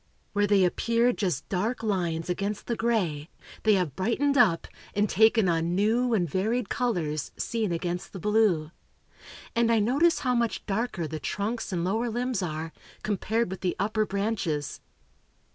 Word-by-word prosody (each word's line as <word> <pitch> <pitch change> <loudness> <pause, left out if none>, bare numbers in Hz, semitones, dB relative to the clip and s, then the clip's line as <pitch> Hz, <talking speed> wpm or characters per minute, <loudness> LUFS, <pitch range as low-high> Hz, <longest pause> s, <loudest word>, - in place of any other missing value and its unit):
Where 205 0 +2
they 195 -2 +4
appeared 235 +6 +1
just 175 -9 -1
dark 220 +6 -1
lines 175 -6 -1
against 200 +3 -2
the 235 - -1
gray, 180 -11 -1 0.3
they 215 -1 +4
have 175 -8 -1
brightened 270 +8 +1
up, 205 -11 +4 0.3
and 205 +1 +2
taken 220 0 +4
on 170 0 +1
new 230 +4 +2
and 175 -5 +1
varied 205 - -1
colors, 170 - -1
seen 225 -5 -1
against 175 +1 -3
the 190 - -7
blue; 200 -6 +2 0.8
and 230 0 +3
I 230 - +4
notice 275 +11 +3
how 250 -2 +1
much 235 -2 -1
darker 200 -5 -2
the 155 +1 -5
trunks 210 - -3
and 175 -2 -1
lower 220 +6 0
limbs 240 -1 -1
are, 160 -2 -4 0.3
compared 215 +1 -1
with 190 - -6
the 180 -2 0
upper 215 +2 0
branches. 195 -8 -2
205 Hz, 160 wpm, -27 LUFS, 175-230 Hz, 0.8 s, they